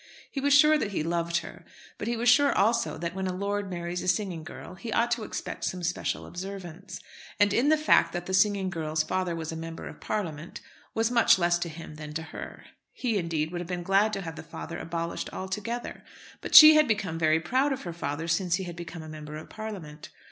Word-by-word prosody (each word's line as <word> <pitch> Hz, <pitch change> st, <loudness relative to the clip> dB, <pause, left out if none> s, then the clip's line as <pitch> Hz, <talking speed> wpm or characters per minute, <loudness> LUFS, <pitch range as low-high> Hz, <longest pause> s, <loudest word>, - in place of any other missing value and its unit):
He 275 Hz, -, -3 dB
was 285 Hz, 0 st, +4 dB
sure 300 Hz, +2 st, +6 dB
that 200 Hz, -6 st, -3 dB
he 155 Hz, -, -1 dB
loved 170 Hz, +1 st, 0 dB
her, -, -, -11 dB, 0.4 s
but 210 Hz, -, -4 dB
he 235 Hz, 0 st, -1 dB
was 240 Hz, +2 st, -1 dB
sure 280 Hz, +4 st, +6 dB
also 230 Hz, +4 st, +2 dB
that 170 Hz, +1 st, -4 dB
when 190 Hz, 0 st, -3 dB
a -, -, -1 dB
lord 200 Hz, +1 st, -2 dB
marries 175 Hz, 0 st, -4 dB
a -, -, -5 dB
singing 180 Hz, -3 st, 0 dB
girl 155 Hz, -, -9 dB
he 225 Hz, +5 st, -7 dB
ought 235 Hz, +1 st, +1 dB
to 240 Hz, -1 st, 0 dB
expect 215 Hz, -, -5 dB
some 180 Hz, -1 st, -3 dB
special 175 Hz, +1 st, -2 dB
observance. 185 Hz, 0 st, -8 dB, 0.4 s
And 205 Hz, 0 st, +5 dB
the 290 Hz, +8 st, +3 dB
fact 305 Hz, -, +4 dB
that 175 Hz, -1 st, -4 dB
the 190 Hz, -, -4 dB
singing 190 Hz, -1 st, +3 dB
girl's 155 Hz, -3 st, -1 dB
father 185 Hz, 0 st, -1 dB
was 160 Hz, -1 st, -4 dB
a -, -, -5 dB
Member 165 Hz, 0 st, -7 dB
of -, -, -11 dB
Parliament 170 Hz, -6 st, -4 dB, 0.4 s
was 225 Hz, +1 st, +1 dB
much 235 Hz, -4 st, +5 dB
less 175 Hz, -1 st, +2 dB
to 170 Hz, -, -3 dB
him 155 Hz, -1 st, -9 dB
than 150 Hz, 0 st, -8 dB
to 160 Hz, -, -2 dB
her. 160 Hz, -, -9 dB, 0.3 s
He, 235 Hz, -5 st, -1 dB
indeed, 160 Hz, -2 st, -2 dB
would 175 Hz, -1 st, -4 dB
have 175 Hz, -, -7 dB
been 175 Hz, -1 st, -4 dB
glad 195 Hz, +4 st, +3 dB
to 195 Hz, -, -2 dB
have 165 Hz, -3 st, -7 dB
the -, -, -6 dB
father 170 Hz, -, -7 dB
abolished 170 Hz, 0 st, -4 dB
altogether. 210 Hz, +6 st, -5 dB, 0.4 s
But -, -, -3 dB
she 310 Hz, 0 st, +13 dB
had 305 Hz, -1 st, +5 dB
become 195 Hz, -7 st, -1 dB
very 160 Hz, 0 st, +3 dB
proud 260 Hz, -, +1 dB
of 270 Hz, 0 st, -3 dB
her 175 Hz, -, -5 dB
father 160 Hz, 0 st, -4 dB
since 175 Hz, +1 st, +1 dB
he 190 Hz, -, -3 dB
had 175 Hz, -2 st, -7 dB
become 170 Hz, -1 st, -8 dB
a -, -, -10 dB
Member 150 Hz, -1 st, -8 dB
of 155 Hz, -, -11 dB
Parliament. 190 Hz, -9 st, -8 dB
180 Hz, 225 wpm, -28 LUFS, 165-215 Hz, 0.4 s, she